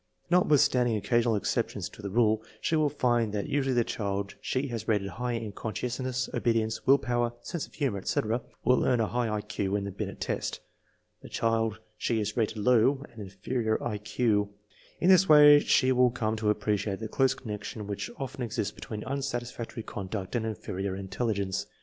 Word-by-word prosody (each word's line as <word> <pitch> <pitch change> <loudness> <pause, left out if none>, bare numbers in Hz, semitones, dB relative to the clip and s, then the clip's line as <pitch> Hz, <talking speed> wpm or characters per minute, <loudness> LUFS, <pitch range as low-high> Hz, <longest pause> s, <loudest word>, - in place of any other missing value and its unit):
Notwithstanding 140 -9 +4
occasional 120 +1 +2
exceptions 100 - -1
to - - -13
the 100 - -4
rule, 110 +1 +3 0.2
she 160 - 0
will 155 -2 +3
find 120 -6 +1
that 105 -1 -1
usually 135 -2 0
the 120 - +4
child 100 -2 -3
she 130 +2 -1
has 115 -2 -5
rated 105 -3 +1
high 125 +6 -3
in 115 -2 -3
conscientiousness, 125 +5 -3
obedience, 110 -2 0
will 135 +1 +7
power, 120 -2 -1
sense 170 - -4
of - - -20
humor, 135 -10 -1
etc., 110 +5 -1 0.2
will 125 - +4
earn 125 - +2
a 115 - +3
high 120 +1 -1
I 105 -1 -1
Q 105 -2 -2
in 100 - -1
the 100 - -4
Binet 95 - -5
test; - - -2 0.6
the - - -11
child 115 -1 0 0.2
she 115 - 0
has 105 0 -2
rated 110 -2 0
low, 125 +5 +3
an 110 - -9
inferior 110 +4 -2
I 105 -3 -2
Q. 105 +1 +1
1 105 0 -2 0.5
In 180 - +4
this 190 -1 +6
way 150 -1 +9
she 130 -2 +3
will 125 -1 +5
come 110 -2 -1
to 110 -1 0
appreciate 105 -1 0
the 110 - -4
close 135 +4 +2
connec 105 -4 -6
tion 105 -2 -6
which 100 -1 -4
often 135 -1 -5
exists 110 -4 -2
between 105 -1 -7
unsatisfactory 120 -4 -4
conduct 95 +1 -5
and 115 -2 0
inferior 95 -2 -4
intelligence. 100 0 -2
115 Hz, 185 wpm, -28 LUFS, 105-125 Hz, 0.6 s, way